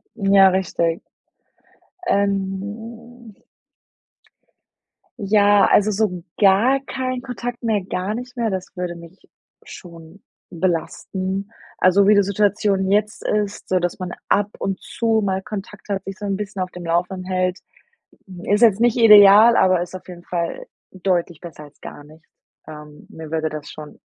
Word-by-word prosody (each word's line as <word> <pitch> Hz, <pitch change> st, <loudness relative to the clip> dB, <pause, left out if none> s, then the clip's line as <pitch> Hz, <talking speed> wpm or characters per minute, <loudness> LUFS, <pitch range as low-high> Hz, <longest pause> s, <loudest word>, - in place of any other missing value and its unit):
Ja, 195 Hz, -2 st, +5 dB
richtig. 170 Hz, -3 st, -1 dB, 1.1 s
Ähm 210 Hz, -, -3 dB, 1.8 s
Ja, 205 Hz, -1 st, +4 dB
also, 210 Hz, +1 st, +3 dB
so 190 Hz, -4 st, -2 dB, 0.2 s
gar 215 Hz, +7 st, +4 dB
keinen 255 Hz, -1 st, -4 dB
Kontakt 245 Hz, -1 st, -6 dB
mehr, 220 Hz, -4 st, 0 dB
gar 190 Hz, +2 st, -3 dB
nicht 250 Hz, +2 st, -8 dB
mehr, 230 Hz, -2 st, -1 dB
das 190 Hz, -1 st, -4 dB
würde 180 Hz, -1 st, -4 dB
mich 170 Hz, +2 st, -14 dB, 0.5 s
schon 170 Hz, +1 st, -13 dB, 0.3 s
belasten. 185 Hz, +3 st, -3 dB, 0.3 s
Also, 195 Hz, +2 st, +4 dB
wie 210 Hz, -, +6 dB
die 200 Hz, -, +5 dB
Situation 200 Hz, -1 st, 0 dB
jetzt 210 Hz, +1 st, 0 dB
ist, 205 Hz, -1 st, -2 dB
so 185 Hz, -, +2 dB
dass 175 Hz, +1 st, -3 dB
man 180 Hz, -1 st, -5 dB, 0.2 s
ab 205 Hz, 0 st, +1 dB
und 195 Hz, -1 st, -3 dB
zu 225 Hz, -1 st, -1 dB
mal 190 Hz, -1 st, -1 dB
Kontakt 210 Hz, 0 st, -9 dB
hat, 195 Hz, -1 st, -2 dB
sich 195 Hz, -1 st, -8 dB
so 205 Hz, -, -6 dB
’n 195 Hz, -1 st, -1 dB
bisschen 195 Hz, -2 st, -5 dB
auf 185 Hz, -, -5 dB
dem 180 Hz, -1 st, -9 dB
Laufenden 175 Hz, +2 st, -2 dB
hält, 185 Hz, 0 st, -1 dB, 0.8 s
ist 205 Hz, +3 st, +1 dB
jetzt 220 Hz, -3 st, +5 dB
nicht 240 Hz, -1 st, +3 dB
ideal, 215 Hz, 0 st, +8 dB
aber 185 Hz, -2 st, +3 dB
ist 180 Hz, -, -8 dB
auf 185 Hz, -, -10 dB
jeden 175 Hz, -1 st, -10 dB
Fall 170 Hz, -2 st, -4 dB, 0.3 s
deutlich 180 Hz, -3 st, -2 dB
besser 165 Hz, -4 st, -11 dB
als 145 Hz, 0 st, -19 dB
gar -, -, -10 dB
nicht. 155 Hz, +2 st, -18 dB, 0.4 s
Ähm, 150 Hz, -1 st, -12 dB
mir 160 Hz, -1 st, -10 dB
würde 160 Hz, -1 st, -2 dB
das 150 Hz, -1 st, -8 dB
schon 150 Hz, -1 st, -12 dB
195 Hz, 150 wpm, -20 LUFS, 180-210 Hz, 1.8 s, ideal